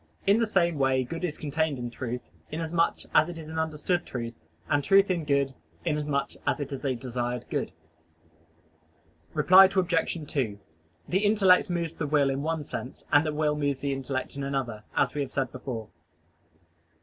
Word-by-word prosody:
In 200 Hz, +3 st, +5 dB
the 230 Hz, -, +2 dB
same 170 Hz, -6 st, +2 dB
way 135 Hz, -1 st, +3 dB
good 165 Hz, +7 st, -6 dB
is 165 Hz, -4 st, -2 dB
contained 155 Hz, 0 st, -1 dB
in 120 Hz, -1 st, -5 dB
truth, 125 Hz, 0 st, -5 dB, 0.2 s
inasmuch 165 Hz, +1 st, 0 dB
as 155 Hz, +2 st, +5 dB
it 175 Hz, -, -7 dB
is 160 Hz, -1 st, -8 dB
an 160 Hz, 0 st, -3 dB
understood 160 Hz, +3 st, 0 dB
truth, 115 Hz, -2 st, -5 dB, 0.3 s
and 145 Hz, -1 st, +2 dB
truth 195 Hz, +4 st, +5 dB
in 170 Hz, -4 st, -1 dB
good, 140 Hz, -2 st, +1 dB, 0.3 s
inasmuch 150 Hz, -3 st, 0 dB, 0.2 s
as -, -, +1 dB
it 145 Hz, -1 st, -4 dB
is 135 Hz, -, -6 dB
a 135 Hz, -2 st, 0 dB
desired 120 Hz, 0 st, -3 dB
good. -, -, -1 dB, 1.6 s
Reply 190 Hz, +1 st, +8 dB
Obj. 180 Hz, -3 st, +1 dB
2: 110 Hz, -9 st, -2 dB, 0.5 s
The 190 Hz, +3 st, +1 dB
intellect 205 Hz, -4 st, +5 dB
moves 170 Hz, -2 st, -2 dB
the 150 Hz, -, -2 dB
will 140 Hz, -2 st, +3 dB
in 135 Hz, +1 st, -2 dB
one 160 Hz, 0 st, -1 dB
sense, 130 Hz, -2 st, -7 dB
and 145 Hz, -, +6 dB
the 155 Hz, -, -1 dB
will 150 Hz, 0 st, +1 dB
moves 145 Hz, -2 st, -1 dB
the 140 Hz, -1 st, 0 dB
intellect 135 Hz, 0 st, -3 dB
in 140 Hz, -, -4 dB
another, 130 Hz, -6 st, -3 dB
as -, -, +2 dB
we 150 Hz, -, -2 dB
have 140 Hz, -, -2 dB
said 135 Hz, -1 st, -1 dB
above. 125 Hz, -4 st, -5 dB
150 Hz, 180 wpm, -28 LUFS, 135-165 Hz, 1.6 s, Reply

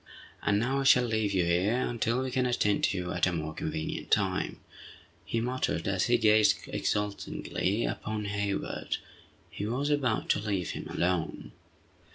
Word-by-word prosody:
"And 105 Hz, -, +2 dB
now 130 Hz, +5 st, +1 dB
I -, -, 0 dB
shall 125 Hz, -2 st, +6 dB
leave 110 Hz, -3 st, 0 dB
you 95 Hz, -3 st, +2 dB
here 90 Hz, +6 st, +2 dB
until 120 Hz, 0 st, 0 dB
we 130 Hz, -, -3 dB
can 125 Hz, 0 st, +1 dB
attend 105 Hz, -4 st, +2 dB
to 100 Hz, -, 0 dB
you 90 Hz, -1 st, -3 dB
at 90 Hz, +1 st, +2 dB
a -, -, +1 dB
more 80 Hz, -2 st, -3 dB
convenient 160 Hz, 0 st, -4 dB
time!" 95 Hz, -3 st, +1 dB, 0.6 s
he 115 Hz, -, -2 dB
muttered, 120 Hz, -8 st, -1 dB
as 100 Hz, -1 st, +1 dB
he 120 Hz, 0 st, +4 dB
gazed 110 Hz, -1 st, +5 dB
exultingly 105 Hz, 0 st, -1 dB
upon 105 Hz, -1 st, -3 dB
Hayward. 100 Hz, 0 st, -2 dB, 0.5 s
He 100 Hz, -, -4 dB
was 135 Hz, +6 st, -1 dB
about 130 Hz, -7 st, +1 dB
to -, -, +3 dB
leave 100 Hz, -5 st, -2 dB
him -, -, -6 dB
alone. 90 Hz, -2 st, -1 dB
105 Hz, 165 wpm, -29 LUFS, 100-125 Hz, 0.6 s, shall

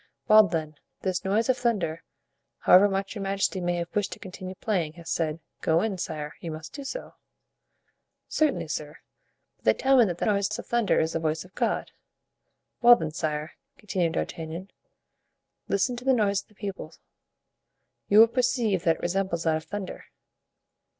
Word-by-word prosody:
"Well, 215 Hz, -2 st, +8 dB
then, 155 Hz, -4 st, -3 dB, 0.2 s
this 185 Hz, -1 st, -1 dB
noise 210 Hz, +4 st, +1 dB
of 260 Hz, -1 st, +2 dB
thunder, 185 Hz, -10 st, 0 dB, 0.6 s
however 200 Hz, +3 st, +7 dB
much 195 Hz, 0 st, -2 dB
your 210 Hz, -, -6 dB
majesty 195 Hz, -1 st, -1 dB
may 175 Hz, 0 st, 0 dB
have 170 Hz, +4 st, -5 dB
wished 205 Hz, -2 st, 0 dB
to -, -, -10 dB
continue 185 Hz, 0 st, -8 dB
playing, 180 Hz, -7 st, -1 dB
has 170 Hz, 0 st, -8 dB
said, 160 Hz, -1 st, -1 dB, 0.2 s
'go 165 Hz, +3 st, +2 dB
in, 205 Hz, -4 st, -2 dB
sire. 150 Hz, -3 st, -4 dB
You 170 Hz, -, -6 dB
must 155 Hz, 0 st, -8 dB
do 280 Hz, -, -7 dB
so.'" 390 Hz, -, -6 dB, 1.1 s
"Certainly, 310 Hz, -1 st, 0 dB
sir; -, -, -4 dB, 0.6 s
but -, -, -35 dB
they -, -, +6 dB
tell 270 Hz, 0 st, +5 dB
me 235 Hz, -, +7 dB
that 175 Hz, -4 st, -3 dB
the -, -, -1 dB
noise 200 Hz, 0 st, +1 dB
of -, -, -7 dB
thunder 235 Hz, -3 st, +2 dB
is 160 Hz, +1 st, 0 dB
the 165 Hz, -, 0 dB
voice 160 Hz, +1 st, -1 dB
of 185 Hz, -, -18 dB
God." -, -, -1 dB, 0.9 s
"Well 240 Hz, 0 st, +9 dB
then, 160 Hz, -9 st, -4 dB
sire," 155 Hz, 0 st, -3 dB, 0.3 s
continued 185 Hz, -6 st, -1 dB
D'Artagnan, 165 Hz, +3 st, -4 dB, 1.0 s
"listen 245 Hz, +5 st, +1 dB
to 245 Hz, -, -8 dB
the 265 Hz, -, +4 dB
noise 200 Hz, -4 st, +2 dB
of -, -, -29 dB
the 210 Hz, -, -25 dB
people; 195 Hz, -1 st, -6 dB, 1.1 s
you 205 Hz, -, +4 dB
will 225 Hz, -, +9 dB
perceive 235 Hz, -6 st, +1 dB
that 165 Hz, -1 st, +4 dB
it -, -, -14 dB
resembles 175 Hz, -2 st, -1 dB
that 160 Hz, -1 st, +2 dB
of 155 Hz, -, -9 dB
thunder." 205 Hz, -2 st, -6 dB
190 Hz, 175 wpm, -27 LUFS, 165-215 Hz, 1.1 s, Well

